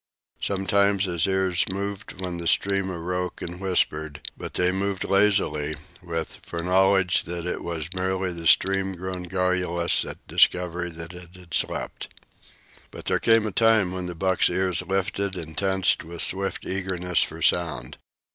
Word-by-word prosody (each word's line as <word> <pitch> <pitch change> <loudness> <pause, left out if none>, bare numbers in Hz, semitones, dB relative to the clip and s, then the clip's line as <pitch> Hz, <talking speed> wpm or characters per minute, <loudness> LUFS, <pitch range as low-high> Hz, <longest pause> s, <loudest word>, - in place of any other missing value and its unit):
Sometimes 100 0 +2
his 85 -2 0
ears 95 -2 +2
moved 100 0 -5
when 90 -2 -4
the 85 - -3
stream 100 +1 +2
awoke 90 0 -3
and 85 +1 -6
whispered; 80 -6 0 0.2
but - - -8
they 90 0 +2
moved 95 0 -1
lazily, 95 -7 +2 0.3
with 85 -2 -4
foreknowledge 95 +2 +2
that 85 0 -4
it 90 - -3
was 85 0 -4
merely 95 0 -1
the 85 -1 -4
stream 95 +1 +3
grown 90 0 -5
garrulous 90 -2 +1
at - - -9
discovery 90 -1 +2
that 85 +1 -8
it 90 0 -12
had 90 -3 -13
slept. - - -1 0.8
But - - -11
there - - +1
came 115 -1 +4
a 110 - -2
time 110 -2 +3
when 90 -1 -4
the 90 - -6
buck's 95 +2 +2
ears 90 0 +1
lifted 95 +1 -2
and 80 -3 -7
tensed 95 0 +2
with 85 +1 -2
swift 95 0 -1
eagerness 90 -2 0
for - - -2
sound. 75 -8 0
90 Hz, 155 wpm, -25 LUFS, 85-95 Hz, 0.8 s, came